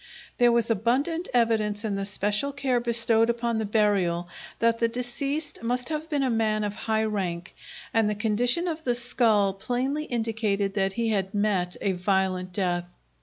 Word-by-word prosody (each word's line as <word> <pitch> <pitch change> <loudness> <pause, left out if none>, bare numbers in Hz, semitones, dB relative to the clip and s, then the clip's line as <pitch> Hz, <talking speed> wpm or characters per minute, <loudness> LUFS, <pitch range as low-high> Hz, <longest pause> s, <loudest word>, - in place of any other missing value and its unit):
There 240 -1 +5
was 235 0 +2
abundant 265 - 0
evidence 225 -3 +1
in 210 - -1
the 195 0 -2
special 205 +6 +1
care 270 -3 0
bestowed 230 -1 +3
upon 235 -1 -1
the 220 - -2
burial 195 -5 +1 0.3
that 230 0 +1
the 230 - +3
deceased 275 +5 -2
must 245 +3 -1
have 315 +1 -4
been 290 -3 0
a 260 - +1
man 215 -2 0
of 205 -1 -2
high 220 +1 -1
rank, 185 -5 -3 0.4
and 225 -2 +2
the 210 - -1
condition 240 - +1
of 325 -2 -3
the 245 -4 +1
skull 225 -5 +2
plainly 250 +9 -2
indicated 220 -5 -1
that 195 -1 0
he 230 0 -1
had 195 -1 -1
met 195 -4 0
a 200 - +1
violent 185 0 -1
death. 175 -2 -1
225 Hz, 170 wpm, -26 LUFS, 200-245 Hz, 0.4 s, There